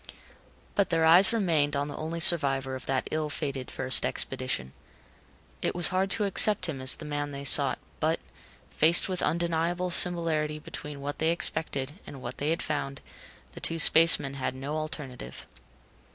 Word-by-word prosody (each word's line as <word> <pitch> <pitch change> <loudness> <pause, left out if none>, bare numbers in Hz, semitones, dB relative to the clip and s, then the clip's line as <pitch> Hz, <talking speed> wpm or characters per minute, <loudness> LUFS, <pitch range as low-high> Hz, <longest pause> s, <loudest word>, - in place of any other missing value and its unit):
But 200 - 0
their 165 -1 0
eyes 175 +4 +7
remained 165 -10 0
on 140 +1 -2
the 145 - -8
only 160 +2 -6
survivor 140 -6 +3
of 130 - -9
that 135 -1 -2
ill 155 -1 -3
fated 140 -3 -5
first 130 0 +2
expedition. 130 - -3 0.9
It - - -3
was 175 - +1
hard 190 +1 -1
to 210 - -1
accept 200 0 +4
him 140 -5 -6
as 130 0 +5
the 155 - -11
man 145 -1 -4
they 140 -1 -8
sought, - - +4 0.2
but, - - -1 0.5
faced 160 - +4
with 185 -2 -2
undeniable 170 +1 -2
similarity 165 -4 +1
between 150 -1 -10
what 145 +1 -6
they 160 - 0
expected 145 -5 0 0.2
and 140 - -10
what - - -9
they 145 - -2
had 165 - -2
found, 140 -2 -5 0.5
the - - -12
two 165 - +1
spacemen 160 -3 +5
had 130 -1 -5
no 135 +3 -7
alternative. 140 - -7
150 Hz, 165 wpm, -26 LUFS, 140-170 Hz, 0.9 s, eyes